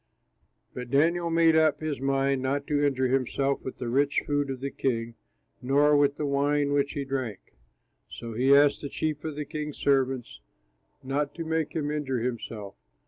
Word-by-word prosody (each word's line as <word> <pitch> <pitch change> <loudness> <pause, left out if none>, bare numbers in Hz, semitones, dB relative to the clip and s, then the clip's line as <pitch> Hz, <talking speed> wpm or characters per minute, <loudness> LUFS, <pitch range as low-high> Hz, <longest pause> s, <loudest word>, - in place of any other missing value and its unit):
But 125 -1 -7
Daniel 170 +5 +2
made 165 -1 +4
up 155 -2 +3
his 155 -4 -3
mind 135 0 +1
not 140 +2 -1
to 145 -1 0
injure 130 -3 +1
himself 135 +1 0
with 130 - -6
the 125 - -5
rich 140 +4 +1
food 145 -1 0
of 135 -1 -4
the 140 +1 -4
king 115 -3 -2 0.5
nor 145 +3 +4
with 145 -1 +3
the 150 - -2
wine 145 +1 +1
which 145 0 +1
he 140 -1 -3
drank. 130 -7 -5 0.6
So 115 -1 -7
he 130 +5 +4
asked 145 0 +4
the 145 - -5
chief 155 0 -3
of 155 -2 -4
the 150 0 -4
king's 150 -1 -5
servants 130 - 0 0.6
not 140 +2 -2
to 165 - -5
make 160 -1 -1
him 150 -2 -1
injure 145 -4 -2
himself. 115 -4 -4
140 Hz, 180 wpm, -27 LUFS, 130-150 Hz, 0.6 s, made